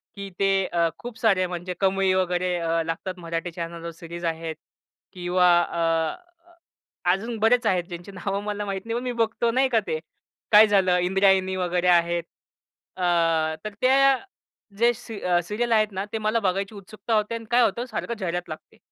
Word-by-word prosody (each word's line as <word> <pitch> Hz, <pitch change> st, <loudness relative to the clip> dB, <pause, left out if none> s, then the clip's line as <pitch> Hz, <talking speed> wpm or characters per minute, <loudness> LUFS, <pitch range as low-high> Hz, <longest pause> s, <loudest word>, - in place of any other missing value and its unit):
की 200 Hz, -1 st, -7 dB
ते 195 Hz, 0 st, +3 dB, 0.2 s
अ, 170 Hz, -2 st, +1 dB
खूप 240 Hz, -2 st, -9 dB
सारे 195 Hz, -5 st, +3 dB
म्हणजे 180 Hz, 0 st, -5 dB
कमई 195 Hz, -1 st, +2 dB
वगैरे 180 Hz, -1 st, 0 dB
अ, 165 Hz, 0 st, 0 dB
लागतात 165 Hz, +3 st, -4 dB
मराठी 165 Hz, 0 st, -4 dB
चॅनलवर 170 Hz, 0 st, -6 dB
सीरीज 170 Hz, +1 st, -8 dB
आहेत 165 Hz, -1 st, -3 dB, 0.6 s
किंवा 180 Hz, 0 st, +2 dB
अ, 165 Hz, -2 st, 0 dB, 1.0 s
अजून 225 Hz, +5 st, -2 dB
बरेच 235 Hz, +2 st, +3 dB
आहेत, 180 Hz, -2 st, +2 dB
ज्यांची 175 Hz, +2 st, -8 dB
नावं 195 Hz, +1 st, -3 dB
मला 210 Hz, 0 st, -3 dB
माहीत 195 Hz, -1 st, -3 dB
नाही, 230 Hz, 0 st, -3 dB
पण -, -, -8 dB
मी 250 Hz, -, -2 dB
बघतो 230 Hz, +1 st, +1 dB
नाही 260 Hz, +2 st, +2 dB
का, 235 Hz, -3 st, +3 dB
ते 155 Hz, -, -1 dB, 0.5 s
काय 215 Hz, +1 st, +8 dB
झालं 190 Hz, -3 st, +3 dB
इंद्रायणी 190 Hz, +1 st, +2 dB
वगैरे 180 Hz, -1 st, 0 dB
आहेत. 170 Hz, -1 st, +3 dB, 0.7 s
अ, 185 Hz, -, -3 dB, 0.6 s
तर 215 Hz, -, -4 dB
त्या 270 Hz, +1 st, +5 dB, 0.6 s
जे 235 Hz, +2 st, +4 dB
सी 225 Hz, -2 st, -9 dB, 0.2 s
सीरियल 220 Hz, +6 st, -2 dB
आहेत 215 Hz, -1 st, +4 dB
ना, 190 Hz, +1 st, -3 dB
ते -, -, 0 dB
मला 215 Hz, +1 st, 0 dB
बघायची 195 Hz, +1 st, -1 dB
उत्सुकता 215 Hz, +3 st, -6 dB
होते 215 Hz, +1 st, +1 dB
अन् 230 Hz, -1 st, -7 dB
काय 245 Hz, +1 st, +5 dB
होतं, 235 Hz, +1 st, +1 dB
सारखं 235 Hz, -1 st, -4 dB
जाहिरात 175 Hz, -2 st, -3 dB
लागते. 155 Hz, -, -10 dB
190 Hz, 170 wpm, -24 LUFS, 175-220 Hz, 1.0 s, काय